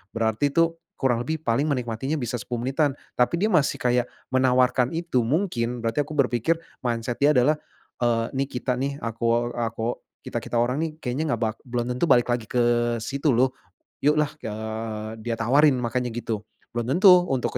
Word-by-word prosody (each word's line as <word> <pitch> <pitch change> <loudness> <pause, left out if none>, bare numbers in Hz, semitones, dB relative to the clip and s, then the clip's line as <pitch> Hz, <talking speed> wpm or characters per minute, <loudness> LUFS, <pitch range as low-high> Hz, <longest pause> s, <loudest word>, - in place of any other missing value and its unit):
berarti 110 +4 +1
itu 165 0 +3 0.2
kurang 120 -3 +1
lebih 160 - 0
paling 120 +6 +1
menikmatinya 125 +1 -2
bisa 120 -3 -3
10 120 +1 -4
menitan, 135 +1 +1 0.2
tapi 125 +7 +3
dia 210 +5 +1
masih 150 -5 +3
kayak 125 0 +2 0.3
menawarkan 125 +1 +3
itu, 170 -6 0
mungkin 125 -7 -1
berarti 115 +3 -1
aku 155 - -7
berpikir, 125 +2 +2 0.3
mindset 120 -1 -2
dia 145 +1 +5
adalah, 150 +5 +3 0.4
eee, 115 -1 +2
nih 135 +1 0
kita 125 0 -2
nih, 140 +1 -1
akuo 115 +1 0
akuo 115 0 -3 0.2
kita-kita - - -4
orang 125 +4 +1
nih 165 - -2
kayaknya 125 +4 -1
nggak 115 - -10
bak 110 -1 -1
belum 120 -1 -2
tentu 125 - -3
balik 120 -6 +4
lagi 120 -3 -1
ke 120 -1 +1 0.4
situ 140 +2 0
loh, 130 +2 +3 0.5
yuk 150 +2 +3
lah, 150 -1 +1
eee, 110 0 -5
dia 115 +1 -3
tawarin 135 +6 +4
makanya 125 +1 -1
gitu, 110 -3 -3 0.3
belum 120 0 -3
tentu 180 -2 +7
untuk 130 -4 -1
125 Hz, 175 wpm, -25 LUFS, 115-140 Hz, 0.5 s, tentu